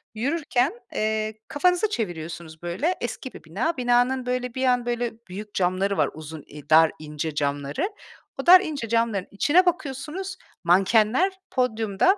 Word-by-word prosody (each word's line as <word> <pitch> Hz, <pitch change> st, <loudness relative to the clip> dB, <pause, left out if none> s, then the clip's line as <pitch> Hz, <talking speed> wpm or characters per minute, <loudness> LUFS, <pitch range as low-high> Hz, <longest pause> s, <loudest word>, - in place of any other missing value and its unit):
Yürürken, 275 Hz, -, 0 dB, 0.2 s
eee, 215 Hz, 0 st, 0 dB
kafanızı 360 Hz, +7 st, +2 dB
çeviriyorsunuz 170 Hz, -, -5 dB
böyle, 190 Hz, -, -1 dB
eski 240 Hz, +2 st, -5 dB
bir -, -, -12 dB
bina. 230 Hz, -, -2 dB
Binanın 245 Hz, +1 st, +2 dB
böyle 250 Hz, -1 st, -2 dB
bir 260 Hz, 0 st, 0 dB
an 250 Hz, -1 st, +2 dB
böyle 240 Hz, -1 st, -1 dB, 0.2 s
büyük 205 Hz, +3 st, -8 dB
camları 190 Hz, +2 st, +1 dB
var, -, -, +2 dB
uzun, 155 Hz, -1 st, -9 dB
i 150 Hz, -1 st, -12 dB
dar, 160 Hz, 0 st, +7 dB
ince 150 Hz, 0 st, -4 dB
camları. 145 Hz, -, -1 dB, 0.5 s
O -, -, -13 dB
dar, 365 Hz, +1 st, +9 dB
ince 290 Hz, -, -4 dB
camların 230 Hz, -4 st, +1 dB
içine 315 Hz, -, +4 dB
bakıyorsunuz, 335 Hz, +3 st, -2 dB, 0.3 s
mankenler 215 Hz, -, +4 dB, 0.2 s
podyumda, 225 Hz, -, +2 dB
230 Hz, 145 wpm, -25 LUFS, 180-275 Hz, 0.5 s, dar